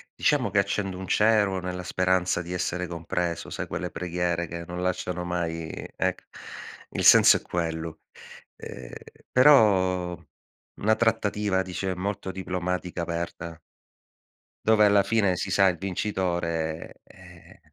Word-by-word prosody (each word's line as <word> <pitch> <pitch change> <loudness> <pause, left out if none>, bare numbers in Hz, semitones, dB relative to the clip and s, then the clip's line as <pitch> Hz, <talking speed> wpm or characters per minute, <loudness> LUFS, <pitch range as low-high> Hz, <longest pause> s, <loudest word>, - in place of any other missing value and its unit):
Diciamo 130 -8 +1
che 100 - +3
accendo 100 -1 -1
un 95 - -6
cero 105 -3 +3
nella 90 0 -5
speranza 90 -1 +1
di 85 +2 -6
essere 90 0 -2
compreso, 85 0 -3
sai - - -4
quelle 90 - -4
preghiere 85 0 -2
che 85 +1 -6
non 90 0 -5
lasciano 90 -1 -2
mai 85 -2 -3 0.3
ecc - - -1 0.7
il - - -3
senso - - +8
è - - -10
quello. 80 -2 -4 0.6
Ehm, 60 -1 -9 0.4
però 95 -10 +4 0.6
una 110 +2 +2
trattativa 105 -4 +1
dice 95 0 -3
molto 95 +1 -3
diplomatica 90 -1 -3
aperta. 85 0 -5 1.1
Dove 110 -1 +5
alla 100 -1 +5
fine 100 -3 +2
si 90 +1 -3
sa 95 +1 +5
il 90 -2 +1
vincitore, 85 -4 -3
eh, - - -17
90 Hz, 130 wpm, -26 LUFS, 85-100 Hz, 1.1 s, senso